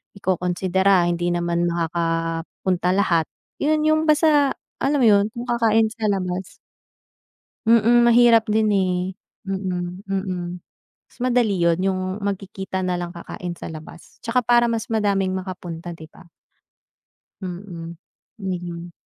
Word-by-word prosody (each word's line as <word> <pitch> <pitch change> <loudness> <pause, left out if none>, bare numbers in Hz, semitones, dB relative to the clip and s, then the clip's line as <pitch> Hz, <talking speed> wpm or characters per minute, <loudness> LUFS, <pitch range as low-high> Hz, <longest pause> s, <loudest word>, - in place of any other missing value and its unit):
ikokonsidera, 185 0 +1
hindi 175 0 0
naman 175 0 0
makakapunta 165 +2 -1
lahat. 185 -4 +2 0.4
'Yon 305 +1 +2
'yong 310 0 +3
basta, 300 -2 +4 0.3
alam 285 +1 +2
mo 245 - +4
'yon, 200 -1 +5
kung 240 +1 -7
kakain 225 -2 +3
sa 225 -1 -9
labas. 185 -1 -3 1.1
Mm, 235 +1 +5
mahirap 235 -1 +6
din, 215 0 +2
eh. 190 -2 +2 0.5
Mm, 185 -2 -3
mm. 180 -2 -3 0.5
Mas - - -25
madali 240 -7 +2
'yon, 170 -1 +3
'yong 185 0 0 0.2
magkikita 190 -1 -4
na 180 -1 -1
lang 175 0 -5
kakain 175 +1 -6
sa - - -8
labas. 160 +1 -11
'Tsaka 240 +2 +2
para 240 0 +4
mas 230 -2 -2
madaming 200 -4 +1
makapunta, 175 -2 -6
'di 160 -1 -12
ba. 170 - -17 1.2
Mm. 175 -2 -7 0.4
Need 185 -3 -3
'yon. 170 0 -7
190 Hz, 130 wpm, -22 LUFS, 175-225 Hz, 1.2 s, mahirap